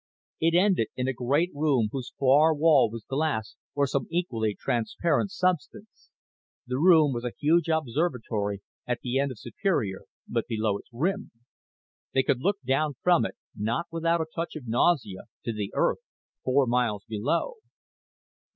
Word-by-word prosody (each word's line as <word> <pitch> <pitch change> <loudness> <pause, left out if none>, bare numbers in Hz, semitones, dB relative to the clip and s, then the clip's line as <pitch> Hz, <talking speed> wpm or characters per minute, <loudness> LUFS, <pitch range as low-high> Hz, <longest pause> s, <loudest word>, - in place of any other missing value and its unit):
It 165 +1 +2
ended 180 - +3
in 125 0 -2
a 130 - 0
great 140 +9 +1
room 140 -7 +1
whose 130 -2 -5
far 145 +4 +5
wall 150 -5 +5
was 115 -1 -8
glass 135 -6 -1 0.2
or 140 0 +3
some 140 0 -2
equally 115 - -1
transparent 150 - 0
substance. 185 +3 -3 0.6
The 125 +1 -2
room 160 -4 +6
was 120 0 -4
a 125 - -3
huge 165 +3 +3
observatory 120 - -1 0.2
at 125 -1 -2
the 125 +1 -1
end 140 0 +1
of 130 - -8
Superior 110 - -2 0.2
but 115 -1 -2
below 110 -3 0
its - - -17
rim. 190 - -1 0.9
They 135 - +4
could 130 - +1
look 200 +8 0
down 140 +3 +1
from 175 -11 +4
it, - - -12 0.2
not 115 +11 -1
without 165 0 +1
a - - -1
touch 165 0 -4
of 150 -5 -7
nausea, 120 - +1 0.2
to 115 - -1
the 105 -2 -4
Earth - - +2 0.4
four 135 +1 +3
miles 115 -4 0
below. 130 - -1
135 Hz, 160 wpm, -27 LUFS, 115-165 Hz, 0.9 s, room